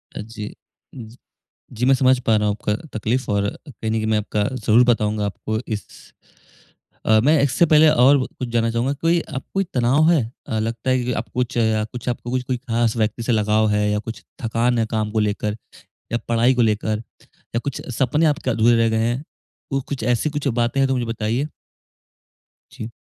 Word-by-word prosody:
अ, -, -, -4 dB
जी। 105 Hz, -1 st, -7 dB, 0.4 s
जी, 115 Hz, -2 st, -10 dB, 0.6 s
जी 120 Hz, +3 st, -1 dB
मैं 135 Hz, -, +5 dB
समझ 130 Hz, 0 st, +3 dB
पा 115 Hz, -3 st, +2 dB
रहा 105 Hz, 0 st, +1 dB
हूँ 105 Hz, -, 0 dB
आपका 105 Hz, -1 st, -1 dB, 0.2 s
तकलीफ़ 120 Hz, +4 st, -1 dB
और 100 Hz, 0 st, +1 dB, 0.2 s
कहीं 110 Hz, -5 st, -6 dB
न -, -, 0 dB
कहीं 110 Hz, -1 st, 0 dB
मैं 110 Hz, 0 st, +2 dB
आपका 105 Hz, 0 st, -1 dB
ज़रूर 115 Hz, +1 st, +4 dB
बताऊँगा 105 Hz, -2 st, +1 dB
आपको 110 Hz, +2 st, -3 dB
इस 110 Hz, -3 st, -3 dB, 1.2 s
अ, 110 Hz, 0 st, +5 dB
मैं 150 Hz, +1 st, +4 dB
इससे 145 Hz, +5 st, +3 dB
पहले 155 Hz, 0 st, +6 dB
और 135 Hz, +2 st, +5 dB, 0.2 s
कुछ 125 Hz, -, -3 dB
जानना 115 Hz, -1 st, +1 dB
चाहूँगा 120 Hz, +4 st, 0 dB
कोई 165 Hz, +4 st, +1 dB, 0.2 s
अब -, -, -3 dB
कोई 195 Hz, -, +1 dB
तनाव 135 Hz, +6 st, +3 dB
है 160 Hz, -6 st, +4 dB, 0.3 s
अ, 110 Hz, -, -1 dB
लगता 115 Hz, +3 st, -3 dB
है 130 Hz, -1 st, +2 dB
कि 125 Hz, -, -2 dB
अब 110 Hz, +1 st, -3 dB
कुछ 125 Hz, -1 st, -1 dB
या 110 Hz, -2 st, +2 dB
कुछ 125 Hz, 0 st, -7 dB
कोई 125 Hz, +1 st, -2 dB
ख़ास 120 Hz, -2 st, 0 dB
व्यक्ति 110 Hz, +1 st, -1 dB
से 120 Hz, -, 0 dB
लगाव 110 Hz, 0 st, +2 dB
है 105 Hz, 0 st, +1 dB
या 105 Hz, -, 0 dB
कुछ 115 Hz, +1 st, -8 dB, 0.2 s
थकान 115 Hz, +2 st, +1 dB
है 115 Hz, -, +2 dB
काम 110 Hz, -2 st, -1 dB
को 110 Hz, -, 0 dB
लेकर 105 Hz, 0 st, -1 dB, 0.5 s
या 115 Hz, -, +1 dB
पढ़ाई 115 Hz, +2 st, +3 dB
को 125 Hz, -, +1 dB
लेकर 110 Hz, -1 st, 0 dB, 0.5 s
या -, -, +2 dB
कुछ 140 Hz, -, -4 dB
सपने 150 Hz, +6 st, +2 dB
आपके 150 Hz, -3 st, +1 dB
अधूरे 115 Hz, +1 st, +4 dB
रह 115 Hz, 0 st, +3 dB
गए 110 Hz, -, 0 dB
हैं? 120 Hz, +4 st, 0 dB, 0.5 s
तो 135 Hz, 0 st, 0 dB
कुछ 140 Hz, -5 st, -4 dB
ऐसी 120 Hz, +5 st, +1 dB
कुछ 145 Hz, -1 st, -3 dB
बातें 120 Hz, +1 st, 0 dB
हैं 135 Hz, -, +4 dB
तो 135 Hz, -, 0 dB
मुझे 125 Hz, -2 st, -1 dB
बताइए। 115 Hz, +4 st, -1 dB, 1.2 s
जी। 110 Hz, -, -7 dB
115 Hz, 200 wpm, -21 LUFS, 110-130 Hz, 1.2 s, पहले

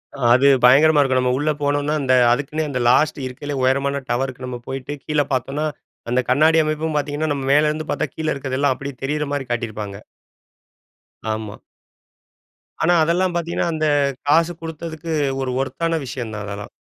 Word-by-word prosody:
அ 140 Hz, -, -10 dB
அது 135 Hz, +3 st, +5 dB, 0.2 s
பயங்கரமா 145 Hz, +5 st, +6 dB
இருக்கும். 130 Hz, -2 st, +2 dB
நம்ம 125 Hz, 0 st, +1 dB
உள்ள 150 Hz, +2 st, +1 dB
போனோம்னா 145 Hz, +1 st, 0 dB
இந்த 130 Hz, -2 st, +2 dB, 0.2 s
அதுக்குன்னே 145 Hz, +5 st, -1 dB
அந்த 130 Hz, -, -2 dB
லாஸ்ட் 145 Hz, +3 st, +3 dB
இருக்கறதுலேயே 135 Hz, +2 st, -5 dB
உயரமான 140 Hz, +2 st, +1 dB
டவருக்கு 130 Hz, +1 st, -2 dB
நம்ம 125 Hz, -1 st, -5 dB
போயிட்டு 135 Hz, +2 st, -5 dB
கீழ 150 Hz, -1 st, +1 dB
பாத்தோம்னா, 135 Hz, +4 st, -1 dB, 0.4 s
அந்த 125 Hz, +1 st, +2 dB
கண்ணாடி 155 Hz, +5 st, +4 dB
அமைப்பும் 155 Hz, 0 st, -2 dB
பாத்தீங்கன்னா, 145 Hz, +1 st, -1 dB
நம்ம 135 Hz, -1 st, -4 dB
மேலருந்து 150 Hz, +1 st, +1 dB
பாத்தா -, -, -1 dB
கீழ 160 Hz, -1 st, -4 dB
இருக்குறதெல்லாம் 135 Hz, 0 st, 0 dB
அப்டியே 140 Hz, -1 st, -7 dB
தெரியிற 150 Hz, +2 st, -1 dB
மாரி 135 Hz, -3 st, -3 dB
காட்டியிருப்பாங்க. 110 Hz, -4 st, -4 dB, 1.4 s
ஆமா. 110 Hz, -1 st, -6 dB, 1.3 s
ஆனா, 175 Hz, -, +4 dB
அதெல்லாம் 175 Hz, +3 st, +1 dB
பாத்தீங்கன்னா, 170 Hz, 0 st, -1 dB
அந்த 155 Hz, -1 st, 0 dB, 0.4 s
காசு 165 Hz, +4 st, +3 dB
குடுத்ததுக்கு 165 Hz, 0 st, -6 dB, 0.3 s
ஒரு 130 Hz, -1 st, -2 dB
வொர்த் 135 Hz, +5 st, -4 dB
ஆன 165 Hz, 0 st, 0 dB
விஷயம் 120 Hz, -2 st, -5 dB
தான் 105 Hz, -1 st, -5 dB
அதெல்லாம். 100 Hz, 0 st, -7 dB
140 Hz, 155 wpm, -21 LUFS, 130-155 Hz, 1.4 s, பயங்கரமா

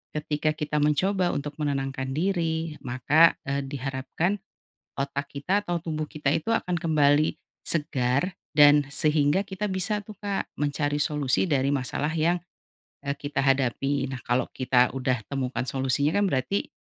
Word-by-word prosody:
ketika 150 Hz, 0 st, 0 dB
kita 150 Hz, 0 st, -2 dB
mencoba 180 Hz, +5 st, +2 dB
untuk 145 Hz, +1 st, -3 dB
menenangkan 135 Hz, -2 st, -2 dB
diri 165 Hz, -3 st, -1 dB
maka, 145 Hz, +6 st, +4 dB
eee, 140 Hz, 0 st, -1 dB
diharapkan, 135 Hz, -, -2 dB, 0.6 s
otak 140 Hz, +1 st, -2 dB
kita 185 Hz, +9 st, 0 dB
atau 175 Hz, -3 st, -2 dB
tubuh 155 Hz, -2 st, -3 dB
kita 150 Hz, -3 st, -3 dB
itu 195 Hz, +8 st, -2 dB
akan 180 Hz, -6 st, 0 dB
kembali, 155 Hz, -3 st, +3 dB, 0.3 s
segar 145 Hz, +1 st, 0 dB, 0.2 s
dan 145 Hz, -1 st, +7 dB
sehingga 150 Hz, +5 st, +2 dB
kita 195 Hz, +2 st, -4 dB
bisa 190 Hz, +3 st, -1 dB
tuh 215 Hz, -, -9 dB
Kak 200 Hz, -1 st, -2 dB, 0.2 s
mencari 145 Hz, 0 st, 0 dB
solusi 150 Hz, 0 st, +1 dB
dari 140 Hz, -3 st, +2 dB
masalah 145 Hz, +3 st, -1 dB
yang, 165 Hz, +2 st, +2 dB, 0.7 s
eee, 140 Hz, 0 st, -2 dB
kita 145 Hz, -1 st, -2 dB
hadapi. 135 Hz, +1 st, +1 dB
Nah 130 Hz, -, -5 dB
kalau 125 Hz, +1 st, 0 dB
kita 125 Hz, -1 st, +3 dB
udah 130 Hz, -1 st, 0 dB
temukan 135 Hz, -2 st, -2 dB
solusinya 135 Hz, +3 st, +1 dB
kan -, -, +3 dB
berarti, 135 Hz, +10 st, -1 dB
145 Hz, 145 wpm, -26 LUFS, 135-165 Hz, 0.7 s, dan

